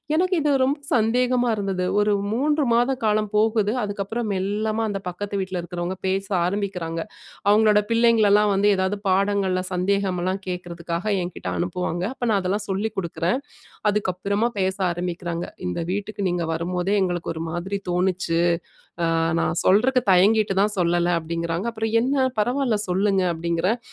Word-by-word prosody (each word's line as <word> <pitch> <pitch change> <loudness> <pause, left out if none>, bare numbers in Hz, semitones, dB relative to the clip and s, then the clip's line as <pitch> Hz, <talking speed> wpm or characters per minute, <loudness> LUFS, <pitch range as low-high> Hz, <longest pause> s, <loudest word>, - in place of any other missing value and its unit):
எனக்கு 365 +3 +2
இது 295 - +2
ரொம்ப 280 +3 +1 0.2
சந்தேகமா 245 +2 +2
இருந்தது. 195 -3 -2 0.2
ஒரு 210 0 +2 0.2
3 295 +5 +1
மாத 245 +3 +3
காலம் 215 -1 +1
போகுது, 215 -1 +2
அதுக்கப்புறம் 205 +2 -3
மெல்லமா 210 +4 -1
அந்த 195 -1 -3
பக்கத்து 200 +3 -4
வீட்டில 185 -1 -3
இருக்கிறவங்க 175 +1 -4
பேச 195 +1 0 0.2
ஆரம்பிக்கிறாங்க. 180 -4 -2 0.5
அவுங்களோட 210 0 +5
பிள்ளைங்களலாம் 215 -3 +4
வந்து 200 +1 +3
ஏதாவது 190 +2 0
பாடங்களில 190 -1 +1
சந்தேகம்லாம் 190 0 0
கேட்கிறதுக்காக 175 0 -4 0.2
என்கிட்டே 175 - -5
அனுப்புவாங்க. 175 0 -2 0.2
அப்போ 245 - -1
நான் 200 - +3
அதெல்லாம் 205 +3 -2
சொல்லி 195 +3 -1
கொடுக்குறேன். 170 +5 -1 0.5
அதுக்கப்புறமா 200 +2 0
பேச 190 0 +1 0.2
ஆரம்பிக்கிறாங்க, 175 -1 -3 0.2
"இந்த 90 - -3
வீட்டுக்கு 205 +1 -4
நீங்க 175 -1 -1
வரும்போதே 180 +4 -1
எங்களுக்கு 175 -2 -1
ஒரு 160 - -5
மாதிரி 180 +4 -3
தோணுச்சு. 180 -2 0 0.7
அ - - +2 0.3
நான் 160 0 0
சொல்றக்கு 250 +7 +4
தயங்கிட்டு 200 +2 +4
தான் 210 +1 +2
சொல்லல", 175 0 +2
அப்படிங்கிறாங்க. 170 +4 -3
அப்புறம், 220 0 -3
"என்ன 260 +2 +2
பரவாயில்ல 245 +1 +1
சொல்லுங்க", 195 +1 +2
அப்படிங்கிறேன். 170 +6 0
195 Hz, 140 wpm, -23 LUFS, 180-215 Hz, 0.7 s, அவுங்களோட